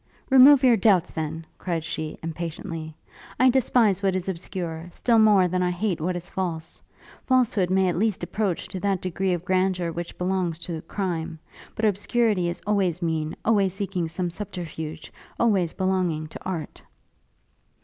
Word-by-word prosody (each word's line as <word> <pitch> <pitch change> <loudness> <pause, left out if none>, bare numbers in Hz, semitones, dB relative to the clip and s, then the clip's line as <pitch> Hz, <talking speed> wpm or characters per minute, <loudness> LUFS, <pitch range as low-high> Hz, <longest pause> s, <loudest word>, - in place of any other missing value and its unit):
'Remove 270 +1 +8
your 250 -3 +6
doubts, 195 -4 +3
then!' 160 0 -4
cried 170 -3 -2
she, 155 -1 -4
impatiently; 165 -1 -5 0.4
'I 255 0 +6
despise 230 -6 +3
what 195 -2 +1
is 185 0 -2
obscure, 170 -2 -5
still 230 +5 +2
more 205 -4 +5
than 180 +1 -1
I 180 - +2
hate 180 -1 -1
what 180 +3 -1
is 175 0 -5
false. 170 -4 -4 0.4
Falsehood 235 -8 +2
may 190 0 +3
at 175 -1 0
least 215 -4 0
approach 195 -1 -2
to 190 - -5
that 195 -1 0
degree 185 +1 -1
of 175 -1 -2
grandeur 185 -2 +1
which 170 +1 -6
belongs 180 -2 -1
to 165 -3 -4
crime; 170 -5 -3 0.4
but 220 - 0
obscurity 205 -2 +1
is 175 0 -5
always 190 -4 +1
mean, 160 -2 -1
always 200 -4 +2
seeking 195 -4 -2
some 175 +2 -3
subterfuge, 165 -5 -6 0.3
always 195 -8 +2
belonging 185 -5 0
to - - -10
art.' 175 -5 -5
185 Hz, 160 wpm, -25 LUFS, 165-200 Hz, 0.4 s, Remove